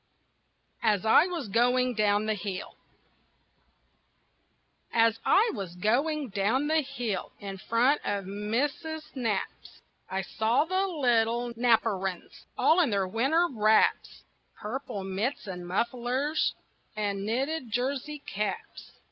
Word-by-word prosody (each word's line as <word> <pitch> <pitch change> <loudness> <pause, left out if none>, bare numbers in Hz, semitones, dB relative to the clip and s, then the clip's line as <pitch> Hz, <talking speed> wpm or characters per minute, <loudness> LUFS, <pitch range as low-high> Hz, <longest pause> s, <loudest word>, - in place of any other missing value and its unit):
AS 210 -3 +2
I 295 +10 +6
WAS 340 -9 -4
GOING 245 +4 +2
DOWN 210 -1 +2
THE 215 - +1
HILL 200 -2 -5 2.2
As 225 -1 +3
I 440 +4 +4
was 190 -6 -6
going 270 - 0
down 210 +8 +1
the 315 +1 +2
hill 245 -8 -4
In 195 -1 -7
front 245 +8 +2
of 200 -1 -2
Missus 265 +10 -3
Knapp's 225 -7 -4 0.3
I 190 0 -2
saw 225 - +1
the 375 +3 0
little 240 -6 +1
Knapperines 225 -6 0
All 325 - +4
in 330 -7 +3
their 200 -3 0
winter 270 - +2
wraps 215 -2 +2 0.3
Purple 215 -3 -5
mitts 200 +9 -2
and 180 -3 -6
mufflers 245 - 0 0.4
And 200 -2 -2
knitted 260 +5 -2
jersey 265 +6 -2
caps. 200 -1 -5
230 Hz, 115 wpm, -28 LUFS, 205-275 Hz, 2.2 s, I